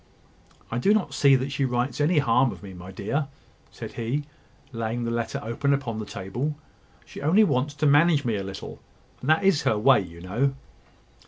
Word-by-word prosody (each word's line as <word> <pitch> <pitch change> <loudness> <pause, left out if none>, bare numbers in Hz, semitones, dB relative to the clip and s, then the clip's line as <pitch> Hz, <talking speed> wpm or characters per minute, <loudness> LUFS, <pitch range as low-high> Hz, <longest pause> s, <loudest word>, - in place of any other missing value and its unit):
"I 120 - -1
do 200 - +4
not 175 -10 -1
see 140 -1 +5
that 130 +2 -1
she 140 0 -1
writes 125 +1 -1
any 155 +3 +2
harm 135 -2 +3
of - - -11
me, 95 -2 -9
my 90 +1 -10
dear," 135 +10 -2 0.4
said - - -8
he, 120 +6 -2 0.5
laying 115 0 -3
the 115 - -2
letter 115 -1 -2
open 140 +5 +1
upon 120 -6 -4
the 105 - -6
table. 120 +11 -4 0.5
"She - - -10
only 170 +9 +5
wants 145 -6 0
to 150 +1 -1
manage 145 0 +4
me 115 -3 0
a 100 - -3
little: 95 0 -8 0.4
and 130 - -4
that 160 +5 +4
is 190 -6 +4
her 110 - +1
way, 130 +4 +5
you 85 -2 -10
know." 120 +10 -1
130 Hz, 195 wpm, -25 LUFS, 110-145 Hz, 0.5 s, see